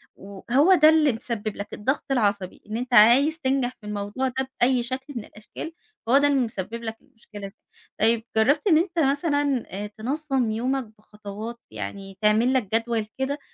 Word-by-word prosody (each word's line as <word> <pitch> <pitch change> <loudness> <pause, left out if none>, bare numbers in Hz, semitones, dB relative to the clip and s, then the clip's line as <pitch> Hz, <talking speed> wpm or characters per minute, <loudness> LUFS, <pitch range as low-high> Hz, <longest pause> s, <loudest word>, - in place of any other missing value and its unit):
وهو 245 - +2
ده 310 -3 +7
اللي 310 -3 +4
مسبب 225 -2 -4
لك 205 - -7
الضغط 265 +7 -1
العصبي 205 -6 0
إن 215 - -2
أنت 250 +1 -4
عايز 260 +9 +6
تنجح 265 -3 +1
في 210 - -10
الموضوع 210 +5 -2
ده 260 +1 -3
بأي 250 0 +3
شكل 260 +4 -5
من 230 -3 -5
الأشكال، 215 +9 -9 0.3
فهو 255 +4 +5
ده 290 +1 +4
اللي 280 -1 +2
مسبب 230 -1 -4
لك 225 0 -5
المشكلة 215 -6 -11
دي. 195 - -15 0.5
طيب 225 +1 +3
جربت 285 - +3
إن 325 -5 +6
أنت 340 +1 0
مثلًا 285 -2 +1
آآ 205 +2 -5
تنظم 255 +3 -2
يومك 255 +4 -1 0.2
بخطوات، 215 +2 -8
يعني 150 - -7
تعمل 220 +4 +3
لك 225 -5 0
جدول 230 -1 0
كده 270 +2 -2
240 Hz, 175 wpm, -24 LUFS, 210-275 Hz, 0.5 s, ده